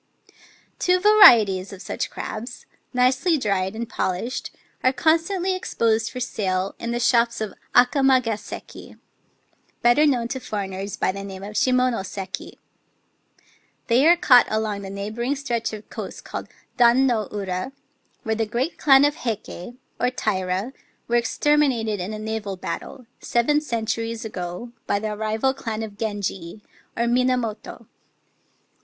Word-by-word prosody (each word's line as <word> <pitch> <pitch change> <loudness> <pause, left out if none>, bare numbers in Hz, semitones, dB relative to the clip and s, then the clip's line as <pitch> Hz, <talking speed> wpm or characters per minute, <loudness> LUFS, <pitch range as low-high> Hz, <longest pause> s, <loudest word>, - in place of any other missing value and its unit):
Two 365 0 +3
varieties 225 - +6
of 195 - -9
such - - -4
crabs 235 +3 -7
— - - -45
nicely 255 +7 +2
dried 195 -5 -1
and 230 +1 -4
polished 190 +8 -3 0.2
— - - -37
are 255 - +5
constantly 335 +7 +1
exposed 225 -10 0
for 255 - -7
sale 190 -5 -2
in 235 - -4
the 240 0 -1
shops 235 -1 +2
of 215 -3 -4 0.2
Akamagaseki 250 -5 +1 0.9
(better 240 +6 +5
known 245 -5 +1
to 265 - -3
foreigners 195 -3 -5
by - - +1
the 195 +1 -7
name 195 -1 -8
of 205 +1 -7
Shimonoseki). 205 -8 -1 1.3
They 255 +5 +4
are 345 +1 +6
caught 250 -7 +6
along 215 -2 -1
the 195 - -7
neighbouring 215 +7 -3
stretch 240 -5 -2
of 215 -1 -9
coast - - -7
called - - -6 0.3
Dan 245 +2 +5
no 225 -6 0
Ura, 190 +2 -3 0.5
where 220 - -1
the 220 0 -1
great 245 +9 -2
clan 275 -1 +6
of 290 - +2
the - - -16
Heike, 225 -2 -5 0.2
or 245 - +2
Taira, 195 -1 -2 0.3
were 235 - 0
exterminated 240 -3 +1
in 180 +4 -4
a 215 - -5
naval 215 -2 -4
battle, 245 +6 -6
seven 295 +6 +1
centuries 230 -3 -3
ago, 180 +3 -6 0.2
by 200 - +1
the 210 +1 -3
rival 220 +5 0
clan 225 -5 -4
of 210 -2 -7
Genji, 205 -3 -4 0.3
or 235 - +1
Mina 250 +1 +2
moto. 225 -3 -6
230 Hz, 145 wpm, -23 LUFS, 205-255 Hz, 1.3 s, varieties